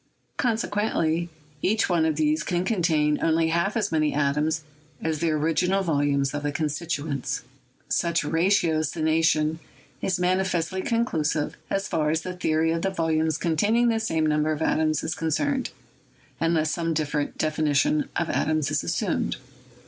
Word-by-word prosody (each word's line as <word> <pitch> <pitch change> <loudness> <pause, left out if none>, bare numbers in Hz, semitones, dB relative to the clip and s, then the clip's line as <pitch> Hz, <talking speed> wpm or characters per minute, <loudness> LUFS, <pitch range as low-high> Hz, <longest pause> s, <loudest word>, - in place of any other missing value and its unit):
Consequently, 205 - 0 0.3
each 220 +3 +2
one 170 -3 +2
of 155 - 0
these 155 +1 +1
can 175 +3 -1
contain 160 -7 +1
only 165 0 +2
half 170 +6 0
as 205 -3 0
many 155 -2 +1
atoms 150 +2 +1 0.4
as 160 -2 -2
the 170 - +1
original 165 +5 +1
volumes 145 -4 +1
of 145 - -2
the 145 0 -1
constituents. 145 -2 -2 0.4
Such 170 -2 +1
ratiocination 160 -2 +1 0.4
is 185 -1 0
manifestly 185 0 0
conclusive 160 -11 0
so - - +1
far 160 -6 -1
as 160 +1 +1
the 180 +2 -5
theory 160 -2 +1
of 165 0 -1
the 195 - +1
volumes 160 -3 0
containing 210 +9 +2
the 225 -1 +1
same 160 -8 0
number 150 0 +1
of 155 +1 -2
atoms 155 -1 +1
is 160 - -1
concerned, 260 - -1 0.7
unless 165 -2 +1
some 165 -1 -1
different 150 -1 -2
defi 155 0 -1
nition 280 - +2
of 170 - 0
atoms 155 -3 0
is - - 0
assumed. - - -1
160 Hz, 150 wpm, -25 LUFS, 155-180 Hz, 0.7 s, each